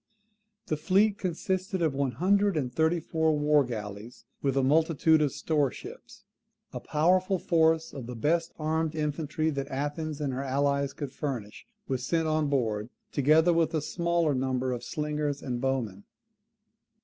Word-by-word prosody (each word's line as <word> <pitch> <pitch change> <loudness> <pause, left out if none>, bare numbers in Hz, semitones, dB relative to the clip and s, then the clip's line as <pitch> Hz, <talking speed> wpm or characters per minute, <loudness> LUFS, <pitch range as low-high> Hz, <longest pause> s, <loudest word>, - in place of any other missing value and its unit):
] 215 0 -51
The 155 - 0
fleet 195 +6 +2
consisted 190 +2 -2
of 155 -4 +1
one 135 -2 -1
hundred 200 - +2
and 125 -4 -2
thirty 160 +4 +2
four 160 -1 0
war 150 0 +4
galleys, 110 -1 -7 0.2
with 135 -1 0
a 135 - +3
multitude 160 +2 +3
of 145 -2 +2
store 150 -2 0
ships. - - -11 0.5
A - - -4
powerful 185 +5 +2
force 160 -1 +2
of 130 -4 -7
the 125 - -6
best 165 +8 +1
heavy 155 - -9
armed 160 0 0
infantry 155 +1 -1
that 140 -1 -3
Athens 145 +3 -3
and 140 -3 -2
her 130 - -3
allies 140 0 0
could 140 -3 -6
furnish 120 - -5 0.2
was 130 -2 -2
sent 165 +4 0
on 155 -1 +1
board, 115 -5 -1 0.2
together 155 +5 +4
with 165 0 +1
a - - +2
smaller 170 -1 0
number 130 -1 -1
of 120 -1 -4
slingers 150 -1 -2
and 125 -2 -3
bowmen. 120 -7 -2
150 Hz, 165 wpm, -28 LUFS, 135-165 Hz, 0.5 s, war